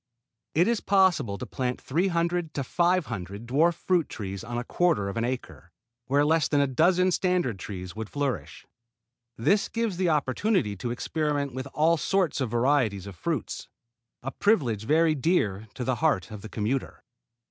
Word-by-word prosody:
It 170 +4 +4
is 235 -2 +1
possible 185 - +3
to - - -5
plant 125 -1 -3
three 170 +8 0
hundred 170 -2 -1
to 140 - -1
five 175 +5 +2
hundred 100 -1 -6
dwarf 155 +8 +3
fruit 175 -2 +1
trees 100 -1 -6
on 120 +1 -5
a 120 - -2
quarter 125 - +1
of 100 - -6
an 115 - -1
acre, 125 +1 -5 0.4
where 140 +2 +3
less 155 -3 +3
than 145 - +2
a 140 - +4
dozen 175 +7 +3
standard 175 - 0
trees 90 -1 -7
would 110 -1 -5
flourish. 140 -3 -3 0.7
This 190 - +2
gives 230 -5 -1
the 185 -2 +2
opportunity 150 - +1
to 100 +6 -4
experiment 145 +2 -1
with 130 +2 -5
all 165 +2 +4
sorts 180 -3 0
and 130 - 0
varieties 120 -5 +1
of 100 -2 -8
fruits, 80 - -3 0.6
a 135 - -3
privilege 125 - +1
very 160 +4 +4
dear 115 - 0
to 130 - -4
the 130 0 0
heart 140 - +1
of 105 -2 -7
the 110 - -9
commuter. 115 +6 -3
140 Hz, 175 wpm, -27 LUFS, 115-170 Hz, 0.7 s, It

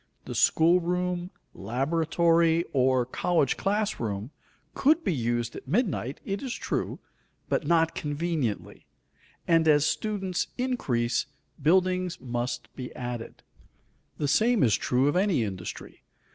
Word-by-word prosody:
The - - -5
school 170 +3 +4
room, 180 0 -2 0.2
laboratory, 165 - +1
or 130 -2 +3
college 145 +3 +1
class 210 +2 -1
room 105 +2 -3 0.4
could 315 +4 +3
be 185 - +1
used 120 -2 -1
at - - -9
midnight, 165 - -1
it 195 0 -3
is 260 -3 -4
true, - - -3 0.5
but - - 0
not 165 -1 +3
conveniently; 150 -6 -3 0.6
and 165 -1 +4
as 150 -1 +5
students 195 -2 -1
increase, 135 - 0 0.3
buildings 185 +3 +2
must 120 -2 -4
be 125 -2 -6
added. 120 -2 -6 0.7
The 145 - -1
same 225 - +3
is 115 -4 +4
true 130 +2 +1
of 145 - +1
any 185 - +2
industry. 95 -4 -7
160 Hz, 125 wpm, -27 LUFS, 125-180 Hz, 0.7 s, as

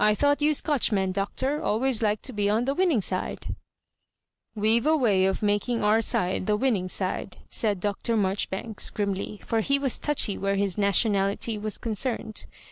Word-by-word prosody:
I 210 0 +4
thought 285 +4 +2
you 300 +1 +3
Scotch 285 -5 +1
men, 190 -2 +1
Doctor, 260 +9 -1
always 235 +2 +1
liked 210 -1 0
to 260 - -2
be 205 -1 0
on 220 +3 +1
the 275 - 0
winning 335 - +2
fiida" - - -3 0.5
" - - -55
"We've 230 +5 +3
*a 315 0 +4
way 205 -8 +3
of 190 +2 -1
making 205 +3 0
our 215 +2 +4
side 185 -3 0
the 210 0 +2
winning 210 -7 0
Bide," 185 0 -3
said 210 -4 +1
Dr. 210 +4 -1
Marjoribanks, 200 +2 -2
grimly, 200 0 -3
for 225 - 0
he 275 +5 +1
was 275 -3 0
touchy 290 -9 0
where 195 0 0
his 195 -2 0
nationality 200 +1 +1
was 215 0 -3
concerned. 225 -1 -3
215 Hz, 180 wpm, -26 LUFS, 200-245 Hz, 0.5 s, I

